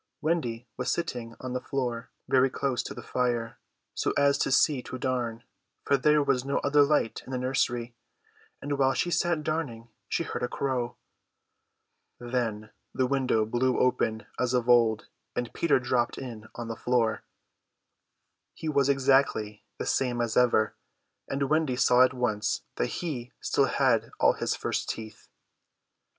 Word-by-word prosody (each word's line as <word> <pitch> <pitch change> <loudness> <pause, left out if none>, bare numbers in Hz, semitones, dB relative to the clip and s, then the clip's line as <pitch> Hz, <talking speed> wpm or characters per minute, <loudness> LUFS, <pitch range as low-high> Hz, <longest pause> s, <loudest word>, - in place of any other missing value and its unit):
Wendy 125 -8 -1
was 125 - -1
sitting 120 -8 -3
on 130 -1 -5
the 125 - -2
floor, 120 -3 -3 0.2
very 130 0 +4
close 130 -1 -1
to - - -7
the - - -8
fire, 120 -2 -1 0.3
so - - -1
as 140 0 +3
to - - +1
see 140 0 +4
to 130 - -7
darn, 120 -3 -2 0.4
for 140 - +3
there 150 +2 +3
was 130 -3 +1
no 140 +1 -1
other 145 +1 +4
light 145 -5 +2
in - - -8
the 130 - -1
nursery; 125 -2 -1 0.7
and 145 0 -2
while 135 -1 +3
she 175 - 0
sat 170 -3 +1
darning 140 -8 -3 0.2
she - - 0
heard - - -5
a 125 - 0
crow. 125 -2 -2 1.2
Then 120 -3 -3 0.2
the 130 - +2
window 130 -4 +1
blew 125 +3 +1
open 110 -3 +1
as 125 0 +1
of 125 -1 0
old, 115 -3 +4 0.3
and 120 -1 -3
Peter 170 -5 +2
dropped 120 -1 0
in 115 -5 -7
on 120 -1 -5
the 115 - -4
floor. 115 -3 0 1.3
He 160 - -6
was 140 -2 +2
exactly 135 -6 +2
the - - -4
same 125 -2 0
as 115 -2 -1
ever, 120 -3 +3 0.5
and 140 0 -1
Wendy 155 -3 +1
saw 125 0 +4
at 130 0 +2
once 115 -4 -1
that - - +1
he 130 -8 -5
still - - +2
had - - +2
all - - +5
his - - -1
first - - -2
teeth. 110 -1 -7
125 Hz, 160 wpm, -28 LUFS, 120-140 Hz, 1.3 s, all